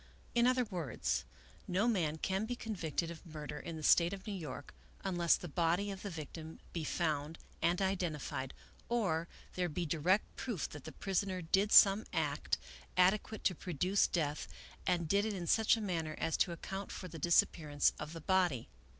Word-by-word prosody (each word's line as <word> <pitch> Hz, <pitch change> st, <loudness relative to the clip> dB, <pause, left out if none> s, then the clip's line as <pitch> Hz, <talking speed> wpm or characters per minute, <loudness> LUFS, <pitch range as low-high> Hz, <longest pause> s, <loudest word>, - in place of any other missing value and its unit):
In 240 Hz, 0 st, +4 dB
other 255 Hz, 0 st, +3 dB
words, 175 Hz, -, -2 dB, 0.4 s
no 190 Hz, +6 st, +2 dB
man 165 Hz, -9 st, +1 dB
can 190 Hz, +6 st, -1 dB
be 245 Hz, -, -2 dB
convicted 170 Hz, -8 st, -2 dB
of 165 Hz, -, -10 dB
murder 150 Hz, -3 st, -7 dB
in 165 Hz, -, -6 dB
the 155 Hz, -, -7 dB
State 170 Hz, +4 st, +5 dB
of 195 Hz, -1 st, -7 dB
New 210 Hz, -, -4 dB
York, 150 Hz, -7 st, -6 dB, 0.3 s
unless 175 Hz, -3 st, +3 dB
the 175 Hz, -, -6 dB
body 175 Hz, +5 st, +1 dB
of 195 Hz, -, -7 dB
the 205 Hz, -, -4 dB
victim 160 Hz, -1 st, -7 dB
be 165 Hz, -, -2 dB
found 155 Hz, -1 st, -1 dB, 0.2 s
and 170 Hz, +1 st, +2 dB
identified, 160 Hz, -8 st, -2 dB, 0.3 s
or 185 Hz, -9 st, +1 dB, 0.3 s
there 180 Hz, -1 st, 0 dB
be 170 Hz, +3 st, -2 dB
direct 170 Hz, +6 st, +1 dB
proof 225 Hz, -, -3 dB
that 145 Hz, -3 st, -10 dB
the -, -, -6 dB
prisoner 190 Hz, -1 st, -1 dB
did 195 Hz, +6 st, +2 dB
some 200 Hz, +1 st, +8 dB
act -, -, 0 dB, 0.4 s
ade 185 Hz, +3 st, +5 dB
quate 220 Hz, -, -9 dB
to 185 Hz, -, +3 dB
produce 180 Hz, +3 st, +1 dB
death, 150 Hz, -4 st, -1 dB, 0.4 s
and 175 Hz, -2 st, +1 dB
did 200 Hz, +5 st, +3 dB
it 215 Hz, -1 st, -1 dB
in 175 Hz, -2 st, -4 dB
such 220 Hz, +5 st, +4 dB
a -, -, -4 dB
manner 165 Hz, -6 st, -2 dB
as 165 Hz, -, 0 dB
to 180 Hz, -, +2 dB
account 195 Hz, +4 st, -5 dB
for 185 Hz, -, -6 dB
the 165 Hz, -2 st, -8 dB
disappearance 150 Hz, -2 st, +3 dB
of 150 Hz, +1 st, -6 dB
the 165 Hz, -, -7 dB
body." 180 Hz, -9 st, +1 dB
175 Hz, 185 wpm, -35 LUFS, 160-195 Hz, 0.4 s, some